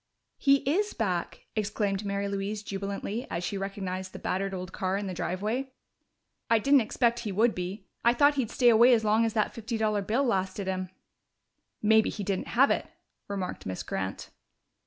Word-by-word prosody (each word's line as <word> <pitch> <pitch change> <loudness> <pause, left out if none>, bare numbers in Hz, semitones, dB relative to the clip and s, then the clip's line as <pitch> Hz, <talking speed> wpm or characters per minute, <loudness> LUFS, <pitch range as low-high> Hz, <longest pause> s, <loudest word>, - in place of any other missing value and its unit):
"He 275 -1 +3
is 410 +9 +1
back!" 185 -6 -2
exclaimed 210 -1 -1
Mary 200 0 -2
Louise 200 +1 -3
jubilantly 200 +4 -4
as 170 - -3
she 200 - -2
recognized 190 -1 -4
the - - -6
battered 195 +1 -2
old 185 -1 -5
car 190 +1 -1
in 205 - -3
the 190 - -4
driveway. 215 +10 -2 0.8
"I 230 - +5
didn't 275 +5 +5
expect 235 +1 +1
he 220 -4 -4
would 220 +4 +3
be. 185 +3 -5 0.2
I 235 +1 +4
thought 285 +4 +5
he'd 265 -6 -1
stay 245 -2 +4
away 240 +2 +7
as 220 - 0
long 215 +2 +4
as 225 - -1
that 215 -2 +1
fifty 230 0 -4
dollar 215 -2 +1
bill 225 +8 +1
lasted 195 -4 -1
him." 185 -1 -2 0.9
"Maybe 220 +1 +5
he 205 - -5
didn't 195 -1 -2
have 270 +3 +4
it," - - 0 0.4
remarked 195 - -4
Miss 95 -1 -4
Grant. 95 0 -4
205 Hz, 180 wpm, -28 LUFS, 190-235 Hz, 0.9 s, away